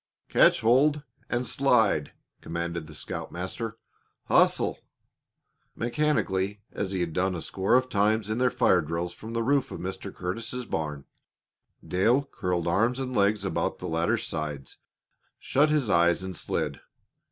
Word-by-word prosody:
"Catch - - +5
hold 140 +6 +3 0.3
and 120 +1 0
slide!" 115 - +2 0.3
commanded 85 -1 -4
the 80 - -11
scoutmaster. 105 +10 -5 0.5
"Hustle!" - - +3 1.0
Mechanically, 105 -7 0
as 95 - -3
he 95 -2 -1
had 85 -2 -2
done 95 +1 0
a 85 - -4
score 95 +5 +1
of 130 0 +3
times 110 -1 +1
in 110 - -1
their 125 0 +4
fire 120 -8 +3
drills 85 +3 -3
from 110 +1 -9
the 115 0 0
roof 140 +2 +2
of - - -7
Mr. 95 +2 -5
Curtis' 115 +7 -4
barn, 75 -7 -3 0.8
Dale 115 +10 +3
curled 90 -6 -2
arms 115 +9 +2
and 130 -1 -4
legs 100 -1 +2
about 95 - -1
the 90 - -6
ladder 80 0 +1
sides, 75 -4 -5 0.6
shut 150 +3 +2
his 150 -5 +1
eyes, 85 -1 +3
and 95 -1 -5
slid. - - -3
100 Hz, 145 wpm, -27 LUFS, 85-125 Hz, 1.0 s, Catch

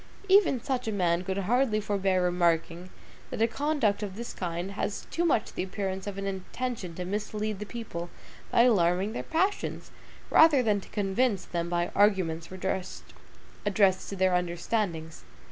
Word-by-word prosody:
Even 385 -9 +5
such 255 -4 -2
a - - 0
man 180 -3 +1
could 190 +1 -3
hardly 220 +3 +2
forbear 195 -3 +1
remarking, 175 0 +1 0.4
that - - -5
a 225 - +5
conduct 255 -5 0
of 200 -3 -4
this 235 +2 -6
kind 175 +1 -4
has 205 0 -3
too 340 - 0
much 300 -11 +1
the - - -3
appearance 190 0 -4
of 200 -1 -5
an 195 - -3
intention 195 0 -4
to 180 - -4
mislead 210 +1 -3
the 210 - -6
people 190 -8 -6 0.4
by 235 - +5
alarming 190 -3 +3
their - - -3
passions, 375 +5 -1 0.4
rather 310 -5 +6
than 210 -3 +1
to - - -14
convince 205 +1 0
them 170 -1 -3
by 175 0 0
arguments 185 -5 +2
addressed 190 +1 -2
to 200 - -5
their 185 -1 +2
understandings. 175 -1 -2
195 Hz, 160 wpm, -28 LUFS, 180-225 Hz, 0.4 s, rather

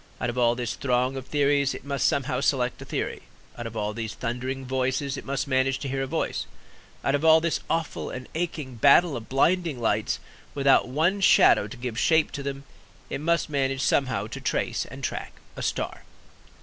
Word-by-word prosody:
Out 120 - -1
of 120 - -10
all 120 -1 +4
this 120 -1 -3
throng 125 0 0
of 135 -1 -6
theories 140 -1 +2
it - - -9
must 140 -1 +1
somehow 135 -2 0
select 130 -4 0
a - - -7
theory; - - -3 0.3
out 120 -1 -5
of 115 0 -8
all 105 0 -1
these 110 -1 -5
thundering 130 +3 -4
voices 130 +1 -1
it - - -8
must 135 0 -2
manage 130 0 +2
to 140 - -5
hear 135 0 -2
a 135 - -2
voice; - - -2 0.6
out 135 - +1
of 145 +1 0
all 160 0 +7
this 170 0 0
awful 165 -1 -2
and 130 0 -7
aching 155 -7 -4
battle 145 +6 +5
of 115 -2 -7
blinding 165 +1 +2
lights, 110 -2 0 0.4
without 140 -2 +4
one 165 +10 +1
shadow 105 - +6
to 115 - -10
give 120 -2 -4
shape 160 -1 +3
to 140 - -5
them, 140 0 -5 0.5
it - - -3
must 170 +2 +1
manage 135 -3 0
somehow 125 -7 +1
to 110 - -7
trace - - -1
and - - -10
to - - +1
track - - -6 0.2
a - - -6
star. - - -2
135 Hz, 200 wpm, -26 LUFS, 125-145 Hz, 0.6 s, all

